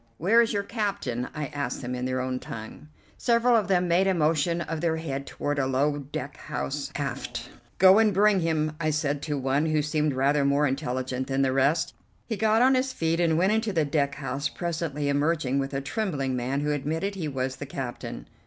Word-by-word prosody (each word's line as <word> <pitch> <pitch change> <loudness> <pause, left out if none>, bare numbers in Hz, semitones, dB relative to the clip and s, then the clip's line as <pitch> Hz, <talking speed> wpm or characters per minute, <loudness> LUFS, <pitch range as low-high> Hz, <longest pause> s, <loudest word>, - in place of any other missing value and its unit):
"Where 220 +8 +5
is 230 - +1
your 200 -1 0
captain?" 200 - -2
I 150 -1 -2
asked 145 -1 -3
them 125 +1 -3
in 125 0 -3
their 130 0 -1
own 130 0 -2
tongue. 110 +6 -9 0.3
Several 235 0 +3
of 215 -5 +2
them 180 -2 +2
made 175 +3 +3
a 190 - +2
motion 165 +1 +1
of 160 -1 -4
their 165 -2 +1
head 140 -4 -4
toward 145 0 -2
a 135 - +1
low 145 +3 +1
deck 140 0 -6
house 70 - -4
aft. - - -4 0.3
"Go 190 +3 +7
and 220 -1 +4
bring 200 +1 +4
him," 155 -2 0
I 155 -1 0
said 145 -2 -1
to 145 -1 -2
one 135 +3 +1
who 155 -1 +1
seemed 150 0 0
rather 140 +2 +2
more 140 +1 +3
intelligent 130 -2 -2
than 135 0 +1
the 130 -1 +1
rest. 140 +5 +2 0.3
He 225 - -3
got 220 +2 +3
on 260 +1 +5
his 260 0 +1
feet 165 -3 0
and 165 -2 +3
went 190 +5 +3
into 220 -1 0
the 160 -4 +2
deck 140 -1 0
house, 135 0 -3
presently 160 -4 -3
emerging 145 -1 +1
with 135 0 -2
a 135 -1 -2
trembling 145 - -2
man 130 +3 -1
who 150 0 0
admitted 160 +7 -2
he 180 -5 -4
was 130 -2 -3
the 145 - -6
captain. 120 - -6
150 Hz, 210 wpm, -26 LUFS, 135-175 Hz, 0.3 s, Go